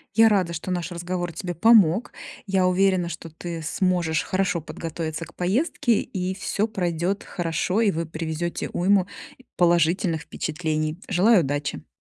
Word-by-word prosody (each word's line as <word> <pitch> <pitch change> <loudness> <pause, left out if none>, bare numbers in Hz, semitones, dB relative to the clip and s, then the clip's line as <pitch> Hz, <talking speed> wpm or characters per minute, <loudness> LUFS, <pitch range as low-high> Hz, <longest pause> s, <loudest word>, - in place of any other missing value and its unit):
Я 225 0 +7
рада, 185 -5 +1
что 170 +3 -4
наш 175 0 -2
разговор 175 0 -3
тебе 175 +2 -4
помог. 205 +1 +4 0.4
Я 190 -1 +2
уверена, 185 -1 +2
что 165 0 -7
ты 165 +1 -6
сможешь 170 -1 0
хорошо 185 -3 0
подготовиться 165 0 -5
к - - -17
поездке, 230 - +1
и 185 0 -3
всё 200 +2 -1
пройдет 180 -1 -1
хорошо, 175 +4 -1
и 215 -3 +3
вы 165 0 -2
привезете 160 +1 -4
уйму 190 +1 +2 0.5
положительных 170 0 +2
впечатлений. 155 -1 -3
Желаю 200 +2 +5
удачи! 145 0 -3
175 Hz, 140 wpm, -24 LUFS, 165-190 Hz, 0.5 s, Я